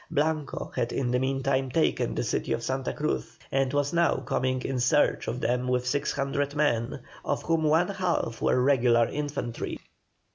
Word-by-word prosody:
Blanco 155 -2 -1
had 120 -2 0
in 125 -3 -1
the 125 - +2
meantime 135 0 0
taken 160 +5 +1
the - - -1
city - - -1
of 115 - -3
Santa 130 0 -1
Cruz, 150 +1 -3
and 135 -1 +1
was 145 +1 0
now 170 0 +3
coming 130 0 -1
in 135 -2 -2
search 145 +5 +2
of 120 - -2
them 125 +1 0
with 125 0 +1
six 140 +3 0
hundred 140 +1 -1
men, 120 -6 +1 0.2
of - - -1
whom 165 -1 +1
one 160 +4 +3
half 180 -11 -1
were - - +3
regular 125 -3 +4
infantry. 145 -5 -4
135 Hz, 175 wpm, -27 LUFS, 125-150 Hz, 0.2 s, regular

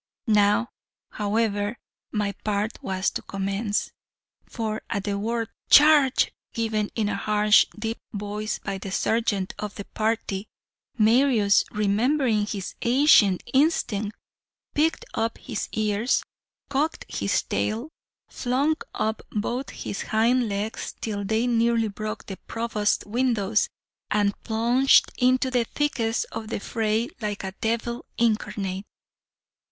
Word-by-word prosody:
Now, 210 0 +3 0.4
however, 210 +1 0 0.3
my 210 -2 0
part 210 +1 -1
was 190 0 -1
to - - -4
commence, 195 +2 -2 0.6
for 220 -2 -3
at 200 - -2
the 200 -1 -2
word 230 +2 -2 0.2
'Charge,' 295 -3 +6 0.2
given 220 -2 -1
in 220 -3 0
a - - -1
harsh, 210 0 +4
deep 225 +1 -3
voice 210 +1 -3
by 195 -1 -5
the 195 0 -6
sergeant 205 -2 0
of 210 -1 -5
the 200 - -7
party, 215 -2 -2 0.5
Marius, 225 -2 +4
remembering 215 +2 +1
his 195 -3 -4
ancient 235 - +5
instinct, 225 -8 +1 0.6
pricked 315 +2 +1
up 225 0 -1
his 230 -5 -5
ears, 215 +3 +1 0.4
cocked 290 +4 -1
his - - 0
tail, 230 +8 -2 0.4
flung 275 +5 0 0.2
up 220 0 -1
both 240 +5 -2
his 195 - -5
hind 230 +2 +2
legs 205 +2 -3
till 205 -2 -3
they 220 +4 +1
nearly 230 -2 +2
broke 215 +2 -5
the 195 - -7
Provost's 225 -2 0
windows, 220 -2 +1 0.4
and 205 -1 +2
plunged 240 +4 +4
into 255 +1 +3
the 245 -2 +2
thickest 235 -5 -1
of 220 - -5
the 220 - -3
fray 220 +2 0
like 205 -2 -3
a 190 0 -4
devil 235 +2 -1
incarnate. 205 -4 0
220 Hz, 125 wpm, -25 LUFS, 205-235 Hz, 0.6 s, Charge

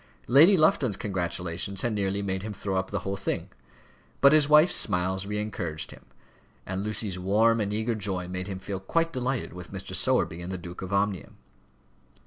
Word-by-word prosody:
Lady 160 +10 +6
Lufton's 140 - +3
congratulations 90 0 -3
had 120 - 0
nearly 100 -1 -1
made 95 -1 -2
him 105 +1 -5
throw 100 0 -4
up 95 - -1
the 100 -3 -3
whole 100 0 -3
thing; 100 - -3 0.7
but 140 +1 +6
his 150 -1 +4
wife's 155 +4 +6
smiles 95 0 +1
re 105 0 -3
encouraged 85 -7 -4
him; - - -15 0.6
and 95 +1 -3
Lucy's 105 -3 -2
warm 110 +5 +3
and 100 -1 -2
eager 110 +3 -1
joy 95 -4 -3
made 90 +1 -5
him 95 -2 -4
feel 95 0 -5
quite 165 +12 0
delighted 130 0 -2
with 90 -1 -10
Mr. 95 -1 -7
Sowerby 85 +2 +1
and 90 +2 -6
the 95 - -3
Duke 85 0 -9
of 95 0 -6
Omnium. 100 -1 -1
100 Hz, 185 wpm, -27 LUFS, 95-110 Hz, 0.7 s, Lady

